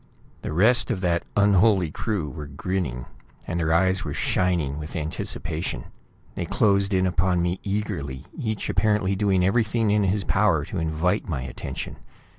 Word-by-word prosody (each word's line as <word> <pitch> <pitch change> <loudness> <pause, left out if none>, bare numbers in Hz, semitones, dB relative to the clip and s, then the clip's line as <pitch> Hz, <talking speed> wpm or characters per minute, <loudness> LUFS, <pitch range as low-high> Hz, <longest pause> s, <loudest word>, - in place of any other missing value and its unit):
The - - -4
rest 110 +10 +3
of 95 - -1
that 85 -2 +1 0.2
unholy 100 -3 +4
crew 100 -3 -2
were 75 +2 -7
grinning, 70 -4 -3 0.4
and 85 - -2
their 80 -1 +1
eyes 95 +3 +3
were 75 -3 -4
shining 85 -6 0
with 75 +1 -7
anticipation. 75 -5 -3 0.5
They - - -3
closed 100 -1 +2
in 95 -1 +2
upon 90 0 +1
me 90 +1 -1
eagerly, 75 -10 -3
each 110 -3 -2
apparently 105 -1 +1
doing 95 -2 +2
everything 110 +1 +2
in 105 -1 +3
his 95 +1 +1
power 95 -9 +2
to 95 - -4
invite 80 +6 0
my 70 -5 -2
attention. 65 - -6
95 Hz, 155 wpm, -25 LUFS, 80-100 Hz, 0.5 s, unholy